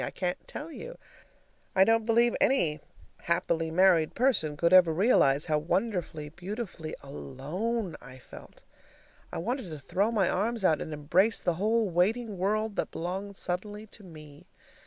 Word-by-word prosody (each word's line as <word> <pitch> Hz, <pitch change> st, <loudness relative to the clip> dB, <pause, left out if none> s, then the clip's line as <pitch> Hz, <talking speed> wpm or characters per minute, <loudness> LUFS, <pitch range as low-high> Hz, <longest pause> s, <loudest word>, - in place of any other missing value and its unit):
I -, -, -2 dB
can't 180 Hz, -1 st, -4 dB
tell 315 Hz, +3 st, -7 dB
you; -, -, -9 dB, 0.8 s
I 190 Hz, -, +7 dB
don't 225 Hz, +2 st, +2 dB
believe 235 Hz, +1 st, +3 dB
any 165 Hz, -, +3 dB, 0.4 s
happily 170 Hz, -1 st, 0 dB
married 170 Hz, -2 st, +3 dB
person 225 Hz, -, +1 dB
could 170 Hz, +3 st, +2 dB
ever 180 Hz, -3 st, +7 dB
realize 155 Hz, -, +3 dB
how 155 Hz, -1 st, +1 dB
wonderfully, 170 Hz, -3 st, -2 dB
beautifully 180 Hz, -1 st, -6 dB
ALONE 160 Hz, -, -4 dB
I 130 Hz, +1 st, -12 dB
felt. 130 Hz, -, -14 dB, 0.7 s
I -, -, -5 dB
wanted 235 Hz, +3 st, -3 dB
to 155 Hz, -, -6 dB
throw 195 Hz, +9 st, 0 dB
my 205 Hz, -6 st, +2 dB
arms 215 Hz, +2 st, 0 dB
out 155 Hz, -4 st, +3 dB
and -, -, -5 dB
embrace 165 Hz, +9 st, +1 dB
the 175 Hz, -, +2 dB
whole 215 Hz, +5 st, +1 dB
waiting 200 Hz, +4 st, 0 dB
world 215 Hz, +2 st, 0 dB
that -, -, -1 dB
belonged 190 Hz, +4 st, -5 dB
suddenly 205 Hz, +4 st, -4 dB
to 215 Hz, 0 st, -13 dB
me. 155 Hz, -1 st, -13 dB
185 Hz, 155 wpm, -29 LUFS, 160-220 Hz, 0.8 s, I